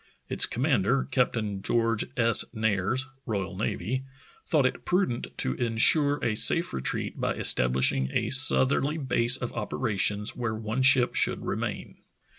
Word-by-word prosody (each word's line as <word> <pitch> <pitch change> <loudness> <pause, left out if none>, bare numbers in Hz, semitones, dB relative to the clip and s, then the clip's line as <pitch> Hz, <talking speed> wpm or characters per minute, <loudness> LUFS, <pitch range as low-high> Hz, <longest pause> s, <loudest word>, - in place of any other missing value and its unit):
Its - - +3
commander, 130 -1 -1
Captain 110 -6 -2
George 115 +1 -1
S. 115 -1 +6
Nares, 110 +3 -1 0.2
R.N., 100 +3 -4 0.4
thought - - +1
it - - -2
prudent 180 -10 -1
to 65 - -2
insure 140 - +2
a 115 - 0
safe 165 +10 +4
retreat 65 - -4
by - - -2
estabHshing 65 +1 +1
a - - -2
southerly 140 +2 +3
base 125 -4 +2
of 120 - -6
opera 110 0 -4
tions 105 +2 0
where 115 -3 -4
one 110 +3 -4
ship 130 -2 +3
should - - -1
remain. - - -5
115 Hz, 135 wpm, -26 LUFS, 105-130 Hz, 0.4 s, S